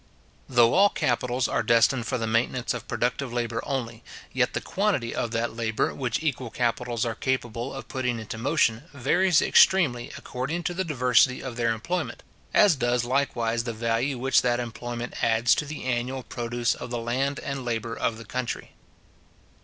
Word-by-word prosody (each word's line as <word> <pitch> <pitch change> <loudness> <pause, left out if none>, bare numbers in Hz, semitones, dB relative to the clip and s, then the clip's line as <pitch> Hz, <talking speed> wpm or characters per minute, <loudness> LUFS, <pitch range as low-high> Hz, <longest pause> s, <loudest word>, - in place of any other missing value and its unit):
Though 120 -2 +5
all 205 +1 +6
capitals 125 -2 0
are - - 0
destined 115 +1 +3
for 130 - -1
the 115 - -2
maintenance 115 +2 0
of 120 -2 -7
productive 120 +2 -1
labour 120 -1 -2
only, 120 -4 -4 0.3
yet - - +1
the - - +1
quantity 190 - -1
of 120 - -2
that 115 0 -2
labour 110 -1 0
which 125 +2 -2
equal 130 -5 -1
capitals 120 -1 -1
are 115 - -1
capable 120 +1 -2
of 135 - -8
putting 125 -3 -2
into 110 0 -6
motion, 130 -2 +1
varies 170 +6 +3
extremely 140 -11 +4
according 150 +8 -4
to 175 - -1
the 190 +2 -1
diversity 125 -5 +3
of 130 -3 -5
their 115 -1 +1
employment; 170 +11 -3 0.3
as 200 -6 +5
does 120 -2 0
likewise 120 -3 0
the 115 - -3
value 115 +4 0
which 135 +2 +3
that 120 -1 +1
employment 120 0 -5
adds 115 +1 +4
to - - -1
the 150 +1 -6
annual 130 +1 -2
produce 120 0 -1
of 125 - -8
the 120 - -2
land 130 +4 -1
and 140 -2 -4
labour 115 -1 -2
of 115 - -1
the 115 - -10
country. 125 +2 -4
120 Hz, 175 wpm, -26 LUFS, 115-135 Hz, 0.3 s, all